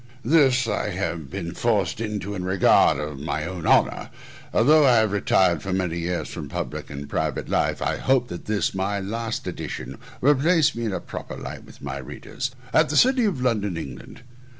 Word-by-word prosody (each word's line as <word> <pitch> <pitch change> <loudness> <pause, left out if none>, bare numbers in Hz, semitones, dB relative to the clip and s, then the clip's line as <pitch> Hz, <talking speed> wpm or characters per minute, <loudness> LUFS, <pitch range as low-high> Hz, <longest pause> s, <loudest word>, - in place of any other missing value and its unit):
This 130 -3 +4
I 105 -1 -1
have 85 -6 -3
been 85 -1 -5
forced 105 -5 0
into 105 -2 -3
in 90 -3 -4
regard 95 -5 +4
of 75 -1 -5
my 75 +1 -3
own 90 -1 -5
honour, - - +3 0.4
although 150 +7 +5
I 130 -3 +6
have 110 -2 +3
retired 95 -4 +2
for 95 - -4
many 90 -3 -1
years 85 +1 -2
from - - -7
public - - -5
and 70 +1 -7
private - - -2
life; - - 0
and - - 0
I - - -3
hope 130 -2 +2
that 85 - -7
this, 105 -1 0
my 100 +1 -1
last 110 +3 -4
edition, 65 +2 -6 0.2
will 145 +4 +5
place 155 +3 +3
me 115 0 -4
in 110 - -1
a 95 - -2
proper - - -7
light - - -8
with - - -16
my 70 -1 -4
readers. 125 - -5 0.2
AT 160 -1 +4
THE 145 - 0
CITY 255 - +5
OF 175 -11 -1
LONDON, 105 -8 0
ENGLAND. 80 - -8
100 Hz, 195 wpm, -24 LUFS, 85-125 Hz, 0.4 s, I